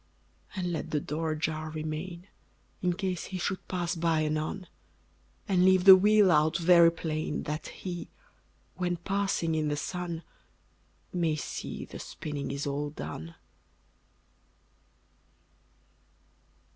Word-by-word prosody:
And 180 -2 -2
let 160 - -3
the 150 - +1
door 160 +3 -3
ajar 155 0 -2
remain, 155 +3 -5 0.6
In 180 -1 +2
case 185 -2 -2
he 190 - -5
should 185 +1 -3
pass 175 -2 -1
by 165 -1 +1
anon; 155 +5 -2 0.8
And 185 -3 +3
leave 185 -1 +5
the 190 0 +12
wheel 205 0 +5
out 155 0 +4
very 170 -1 +6
plain, 155 -2 -3
That 150 +1 -4
HE, 175 -2 -6 0.6
when 175 -1 -1
passing 190 -2 0
in 155 -1 0
the 145 0 -1
sun, 170 +1 -4 0.9
May 165 -3 +1
see 145 - -5
the - - -9
spinning 145 -3 -5
is 140 +1 -3
all 145 +1 -2
done. 80 - -7
165 Hz, 120 wpm, -29 LUFS, 155-180 Hz, 0.9 s, the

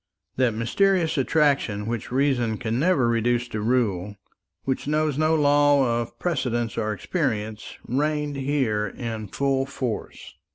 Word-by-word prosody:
That 125 -4 +1
mysterious 170 - +2
attraction 135 -8 +1
which 115 +1 -4
reason 125 -4 +1
can 115 +2 -2
never 150 -6 +3
reduce 120 +1 +1
to 110 - -3
rule, 105 -5 0 0.5
which 135 0 -2
knows 155 -1 +1
no 155 +2 +2
law 145 -5 +3
of 115 - -8
precedent 120 -9 -1
or 110 -1 -1
experience, 110 - -3
reigned 150 +3 -1
here 130 -7 0
in 110 0 -5
full 135 +4 0
force. 130 -5 -5
125 Hz, 130 wpm, -24 LUFS, 115-145 Hz, 0.5 s, never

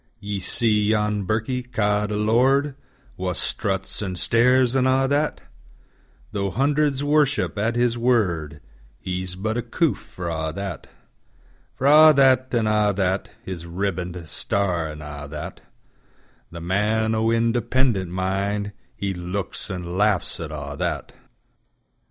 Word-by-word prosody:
Ye 105 -1 -4
see 105 +2 +1
yon 105 -2 +1
birkie, 110 +5 -1
ca'd 105 -4 0
a 105 - -2
lord, 130 +7 +3 0.4
Wha 90 0 -2
struts, 95 +3 -2
an' 95 -3 -3
stares, 125 +6 +3
an' 130 -1 +3
a' 135 +1 +3
that; 145 +2 0 0.9
Tho' 100 -2 -1
hundreds 140 - +1
worship 145 -3 +2
at 115 +3 0
his 120 -1 +1
word, 85 -12 +1 0.4
He's 90 0 -4
but 110 +4 -2
a - - 0
coof - - 0
for 90 -1 -8
a' 80 -1 -2
that:For 95 - -10
a' 155 +2 +8
that, 130 -1 +4
an' 115 -3 +1
a' 105 -1 +3
that, 95 0 0
His 85 -3 -6
ribband, 90 -1 -3
star, 85 0 -1
an' 75 0 -8
a' 75 -1 -7
that:The 80 +2 -12
man 105 +5 +1
o' 110 0 +1
independent 115 -3 +1
mindHe 100 +2 -3
looks 90 +4 -4
an' 90 -1 -4
laughs 105 -3 +1
at 80 -2 -5
a' 70 -1 -6
that. - - -2
105 Hz, 130 wpm, -23 LUFS, 90-120 Hz, 0.9 s, a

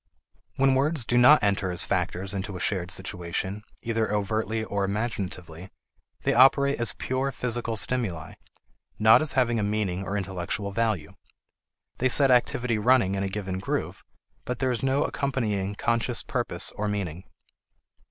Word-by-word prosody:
When 135 0 +3
words 140 -1 +1
do 120 - 0
not 125 +5 +7
enter 100 -2 +1
as 90 - -1
factors 95 +1 -2
into 95 -1 -4
a - - -8
shared 90 -2 -1
situation, 95 +2 -3 0.2
either 115 -2 -1
overtly 110 +2 -1
or 100 -2 -2
imaginatively, 95 -5 -4 0.5
they - - +2
operate 140 +2 +5
as 120 - 0
pure 130 +1 -1
physical 120 -2 -2
stimuli, 105 -9 -1 0.6
not 110 +5 +6
as 155 - +2
having 120 -4 +2
a - - 0
meaning 100 -3 -1
or 100 +1 -3
intellectual 95 +1 -3
value. 105 -7 -1 0.9
They 130 - +2
set 135 +1 +5
activity 120 -2 +2
running 115 -4 +3
in 100 - -2
a 100 - -1
given 95 -2 -4
groove, 95 - -3 0.4
but 125 - -4
there 130 -1 0
is 120 - -2
no 135 +2 +1
accompanying 105 -8 -2
conscious 115 +2 -1
purpose - - 0
or 105 - -4
meaning. 95 -4 -4
105 Hz, 150 wpm, -26 LUFS, 95-125 Hz, 0.9 s, not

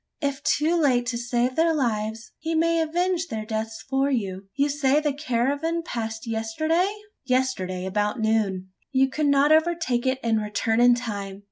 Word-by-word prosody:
If 280 -2 -2
too 325 +3 +2
late 250 -5 +3
to 240 - -2
save 240 +1 0
their 325 0 +3
lives, 220 -4 -2
he 325 +1 -2
may 330 +1 +2
avenge 350 +2 0
their 220 -7 -4
deaths 220 0 -4
for 270 +1 +1
you. 195 -7 -2
You 280 +1 +2
say 285 0 +2
the 300 -2 0
caravan 285 +4 -1
passed 225 -6 -4
yesterday?" 315 - 0 0.3
"Yesterday 255 -9 -1
about 210 +4 -1
noon." 210 -4 0 0.2
"You 265 0 +2
could 300 +1 0
not 280 +1 +4
overtake 315 -6 +2
it, 260 0 +1
and 225 -2 +1
return 215 +2 0
in 245 0 +6
time. 200 -5 -5
255 Hz, 165 wpm, -25 LUFS, 220-300 Hz, 0.3 s, in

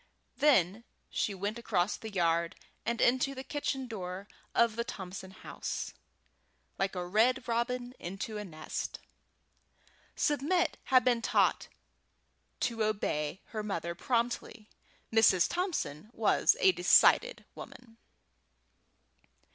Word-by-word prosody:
Then 225 - +3 0.3
she 205 - -1
went 205 +4 -3
across 185 -4 0
the 220 - -8
yard 170 -2 +1 0.3
and 235 0 0
into 260 +3 +2
the 260 - -6
kitchen 270 -2 -3
door 190 -4 -6 0.3
of 235 -2 +3
the 235 - -1
Thompson 190 -5 -7
house, 190 - -6 0.9
like 195 0 0
a 180 -1 -3
red 240 +7 +2
robin 245 +1 -1
into 195 +4 -5
a - - -4
nest. 155 -6 -5 1.2
Submit 310 +4 +1
had 255 -1 +4
been 240 -2 +3
taught - - +2 0.9
to 230 -2 0
obey 190 -6 -1
her 215 - -4
mother 170 -5 -3
promptly. 235 0 -2 0.5
Mrs. 210 -5 +5
Thompson 295 - -3
was 220 -2 +3
a 190 - +6
decided 180 - +4
woman. 230 -2 -12
220 Hz, 115 wpm, -31 LUFS, 185-250 Hz, 1.2 s, a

